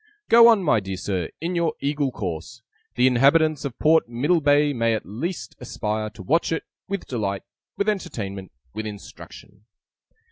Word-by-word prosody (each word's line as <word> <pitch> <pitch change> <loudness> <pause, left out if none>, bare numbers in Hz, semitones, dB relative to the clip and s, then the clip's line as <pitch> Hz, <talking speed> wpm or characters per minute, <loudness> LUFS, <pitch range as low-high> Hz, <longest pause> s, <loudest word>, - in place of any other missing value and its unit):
Go 230 0 +8
on, 225 -5 +5
my 145 -9 +3
dear 95 -1 -5
Sir, 90 -3 -3
in 170 +3 -3
your 170 -2 0
Eagle 145 -1 -1
course! 95 +5 -6 0.3
The 125 - +3
inhabitants 140 +4 +3
of 130 -4 -5
Port 160 -5 +3
Middlebay 145 +3 +2
may 115 -2 +1
at 110 - -5
least 115 - -5
aspire 110 0 -3
to 100 - -9
watch 165 - +1
it, 165 - -1 0.2
with 200 -1 -4
delight, 100 -6 -3 0.3
with 200 - -1
entertainment, 105 - -3 0.2
with 110 0 -4
instruction! 100 0 -12
130 Hz, 155 wpm, -23 LUFS, 105-160 Hz, 0.3 s, Go